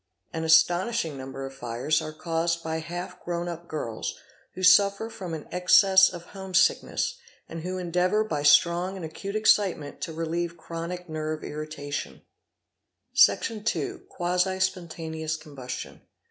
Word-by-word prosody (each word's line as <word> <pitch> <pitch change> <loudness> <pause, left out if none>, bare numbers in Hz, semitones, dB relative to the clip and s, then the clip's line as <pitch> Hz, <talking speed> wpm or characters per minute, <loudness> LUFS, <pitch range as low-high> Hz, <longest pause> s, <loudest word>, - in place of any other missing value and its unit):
An 160 - -3
astonishing 175 +2 +3
number 135 0 -6
of 135 - -8
fires 125 +4 -1
are 155 - -5
caused 165 +1 -1
by 160 0 -2
half 175 +3 -7
grown 175 0 -3
up 170 0 -6
girls 115 -9 -4 0.4
who 185 - -6
suffer 200 +4 +5
from 185 -7 -5
an 155 - -8
excess 190 +2 +6
of 175 -2 -8
home 190 -2 -6
sickness, 480 - +2 0.3
and 165 0 -7
who 185 +2 -4
endeavour 180 +4 +1
by 155 -9 -2
strong 170 +6 +4
and 185 -4 -6
acute 195 +6 -6
excitement 200 -8 +2
to - - -3
relieve 165 +1 -3
chronic 170 +2 -6
nerve 155 -1 -4
irritation 150 -1 -5 0.9
4, - - -48
Section 220 -2 +4
ii.—Quasi 180 +4 -1
Spontaneous 160 -4 -2
Combustion. 140 -6 -8
170 Hz, 140 wpm, -26 LUFS, 155-185 Hz, 0.9 s, excess